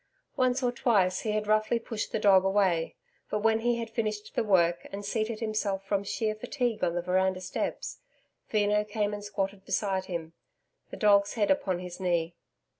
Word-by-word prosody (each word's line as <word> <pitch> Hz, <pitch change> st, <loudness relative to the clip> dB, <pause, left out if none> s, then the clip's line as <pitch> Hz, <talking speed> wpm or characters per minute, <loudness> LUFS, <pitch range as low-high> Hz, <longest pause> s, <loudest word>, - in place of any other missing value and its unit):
Once 255 Hz, -1 st, +1 dB
or 245 Hz, -, +2 dB
twice, 195 Hz, -7 st, +2 dB
he 215 Hz, -, -2 dB
had 215 Hz, 0 st, -1 dB
roughly 215 Hz, +2 st, +2 dB
pushed 225 Hz, -2 st, -4 dB
the -, -, 0 dB
dog 195 Hz, -3 st, +5 dB
away, 190 Hz, -4 st, +1 dB, 0.3 s
but, 210 Hz, 0 st, -2 dB
when 225 Hz, 0 st, +3 dB
he 240 Hz, +1 st, +1 dB
had 230 Hz, -1 st, -3 dB
finished 215 Hz, -2 st, -3 dB
the -, -, +1 dB
work 175 Hz, -5 st, +2 dB
and 200 Hz, +1 st, -6 dB
seated 220 Hz, +2 st, -2 dB
himself 210 Hz, -3 st, -1 dB
from 200 Hz, 0 st, 0 dB
sheer 215 Hz, +2 st, -1 dB
fatigue 235 Hz, 0 st, -2 dB
on 170 Hz, -1 st, +1 dB
the 175 Hz, -, -1 dB
veranda 185 Hz, +1 st, +1 dB
steps, 185 Hz, 0 st, -4 dB, 0.5 s
Veno 210 Hz, -1 st, +2 dB
came 210 Hz, 0 st, -1 dB
and 205 Hz, 0 st, -5 dB
squatted 200 Hz, -1 st, -3 dB
beside 190 Hz, -2 st, -1 dB
him, 170 Hz, -3 st, -5 dB, 0.6 s
the -, -, -8 dB
dog's 205 Hz, -1 st, +4 dB
head 210 Hz, 0 st, +2 dB
upon 245 Hz, -11 st, +1 dB
his 180 Hz, 0 st, -8 dB
knee. 170 Hz, -2 st, 0 dB
205 Hz, 185 wpm, -29 LUFS, 190-215 Hz, 0.6 s, dog